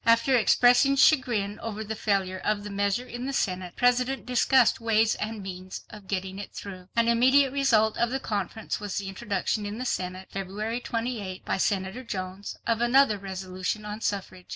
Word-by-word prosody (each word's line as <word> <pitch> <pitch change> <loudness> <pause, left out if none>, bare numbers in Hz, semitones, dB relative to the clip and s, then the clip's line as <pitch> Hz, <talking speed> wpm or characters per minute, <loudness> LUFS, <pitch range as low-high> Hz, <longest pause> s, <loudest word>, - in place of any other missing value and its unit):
After 230 +3 +4
expressing 245 +4 +5
chagrin 235 -8 +3
over 220 -1 -5
the 220 +1 -4
failure 195 -3 0
of 210 0 -1
the 205 - -6
measure 200 +4 0
in 245 +1 -6
the 275 - -3
Senate, 185 -6 -1
the - - -16
President 250 +2 +2
discussed 250 0 +3
ways 225 -1 +3
and 215 -1 -4
means 185 0 -7
of 210 -3 -12
getting 190 0 -3
it 205 - -7
through. 185 -2 -9
An 230 0 +3
immediate 260 +3 +4
result 225 -6 +3
of 235 0 +2
the 265 +2 -2
conference 210 -2 -3
was 205 -2 -4
the 200 - -3
introduction 205 +1 -2
in 205 +1 -5
the 255 - -4
Senate, 185 -4 -3
February 210 +5 -4
28th, 225 -6 -4
by - - 0
Senator 190 +5 -1
Jones, 190 -3 -5
of 230 0 0
another 240 -3 +4
resolution 190 +1 -4
on 210 +1 -6
suffrage. 190 -3 -3
210 Hz, 180 wpm, -27 LUFS, 195-240 Hz, -, expressing